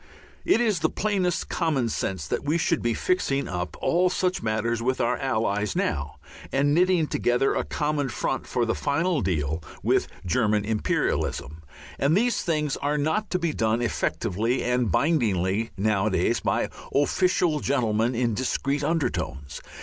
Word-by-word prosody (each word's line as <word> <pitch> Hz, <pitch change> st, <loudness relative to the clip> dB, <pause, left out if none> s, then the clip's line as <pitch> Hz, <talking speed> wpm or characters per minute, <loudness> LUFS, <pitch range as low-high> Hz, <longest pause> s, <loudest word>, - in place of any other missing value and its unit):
It 340 Hz, -, +3 dB
is 215 Hz, -7 st, +2 dB
the -, -, +1 dB
plainest 195 Hz, -4 st, -1 dB
common 150 Hz, -8 st, 0 dB
sense 95 Hz, -8 st, -3 dB
that -, -, -2 dB
we 150 Hz, +3 st, +1 dB
should 165 Hz, -1 st, +1 dB
be 120 Hz, -1 st, 0 dB
fixing 140 Hz, -7 st, 0 dB
up 90 Hz, -1 st, -4 dB
all 180 Hz, +2 st, +3 dB
such 185 Hz, 0 st, 0 dB
matters 115 Hz, +1 st, -1 dB
with 130 Hz, +2 st, 0 dB
our 120 Hz, +1 st, +2 dB
Allies 110 Hz, -5 st, -1 dB
now, 70 Hz, -2 st, -1 dB, 0.4 s
and 145 Hz, +2 st, +2 dB
knitting 180 Hz, 0 st, +3 dB
together 125 Hz, -2 st, +1 dB
a -, -, 0 dB
common 150 Hz, -2 st, -1 dB
front 110 Hz, -, -2 dB
for 120 Hz, -, 0 dB
the 115 Hz, -, 0 dB
final 165 Hz, +1 st, 0 dB
deal 80 Hz, -4 st, -1 dB, 0.2 s
with -, -, +2 dB, 0.2 s
German 105 Hz, +2 st, +1 dB
Imperialism. 90 Hz, -, -1 dB, 0.4 s
And 145 Hz, +6 st, +3 dB
these 240 Hz, +3 st, +1 dB
things 150 Hz, -4 st, -1 dB
are 145 Hz, +1 st, -1 dB
not 160 Hz, +9 st, 0 dB
to 180 Hz, -, +1 dB
be 170 Hz, -3 st, -1 dB
done 110 Hz, +1 st, +1 dB
effectively 115 Hz, 0 st, -1 dB
and 125 Hz, -4 st, +1 dB
bindingly 110 Hz, -, +1 dB
nowadays 100 Hz, -1 st, +1 dB
by -, -, 0 dB, 0.3 s
official 170 Hz, +2 st, +2 dB
gentlemen 120 Hz, -4 st, +1 dB
in 120 Hz, -1 st, +1 dB
discreet 140 Hz, +5 st, -1 dB
undertones. 70 Hz, -, -2 dB
130 Hz, 150 wpm, -25 LUFS, 110-160 Hz, 0.4 s, It